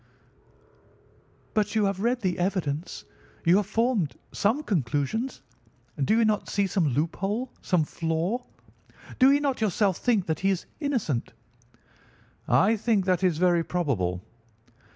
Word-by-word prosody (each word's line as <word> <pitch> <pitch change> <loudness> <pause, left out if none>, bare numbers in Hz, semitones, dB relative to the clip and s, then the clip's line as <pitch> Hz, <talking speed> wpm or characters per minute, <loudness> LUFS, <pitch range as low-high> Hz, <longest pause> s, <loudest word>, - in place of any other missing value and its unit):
"But 210 0 0
you 215 -2 +3
have 195 -1 -1
read 240 +4 0
the 185 -3 -1
evidence. 175 -3 -2 0.4
You 170 +3 +6
have 205 -1 0
formed 225 - 0 0.2
some 235 +9 +1
conclusion? 160 - -1 0.7
Do 215 +11 +3
you 230 - +4
not 215 -1 0
see 200 0 +1
some 185 -4 +1
loophole, 195 - -1
some 180 -4 +2
flaw? 165 +10 -2 0.8
Do 265 +1 +7
you 285 - +4
not 275 -4 -1
yourself 200 -2 +1
think 220 -7 +1
that 160 -3 -2
he 195 - +1
is 190 -3 -1
innocent?" 235 - -2 1.1
"I 220 +4 +4
think 210 -3 +1
that 185 0 +1
it - - +6
is 170 -4 -1
very 175 -1 +3
probable." 100 - -1
195 Hz, 140 wpm, -26 LUFS, 165-225 Hz, 1.1 s, Do